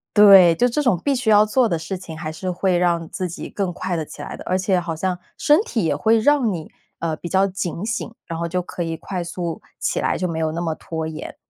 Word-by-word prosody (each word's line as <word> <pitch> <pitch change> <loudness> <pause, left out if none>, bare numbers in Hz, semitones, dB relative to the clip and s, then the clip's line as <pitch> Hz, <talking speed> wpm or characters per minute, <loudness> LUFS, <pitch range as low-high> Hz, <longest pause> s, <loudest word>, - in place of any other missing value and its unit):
对， 195 -5 +8
就 245 - +3
这 250 +5 0
种 230 -11 +2
必 285 - +2
须 245 -3 -1
要 210 0 +6
做 235 +2 +2
的 170 - 0
事 165 +4 -5
情 165 -3 -9
还 155 -1 -4
是 185 +3 -5
会 180 0 +1
让 170 -2 +1
自 185 -2 -3
己 170 - -7
更 195 -3 -2
快 180 +1 -3
地 160 - -1
起 - - -10
来 - - -6
的。 - - -10
而 185 - +1
且 190 0 +1
好 170 -2 -4
像 180 +2 -1 0.2
身 300 +3 +4
体 235 - -2
也 155 - +1
会 220 +10 +3
让 265 -1 +3
你， 165 -4 -6 0.3
呃， 165 -1 -1
比 175 - -7
较 190 +2 +3
警 185 -1 -4
醒， 230 +1 -3
然 165 -1 -5
后 170 - -1
就 180 +2 -1
可 175 0 -7
以 165 -1 -2
快 180 +2 -4
速 170 -1 -4 0.2
起 - - -1
来， - - 0
就 180 - -1
没 160 -1 -3
有 160 -1 0
那 165 +2 -3
么 165 -2 -1
拖 160 0 -5
延。 155 -1 -7
180 Hz, 280 characters per minute, -21 LUFS, 165-205 Hz, 0.3 s, 对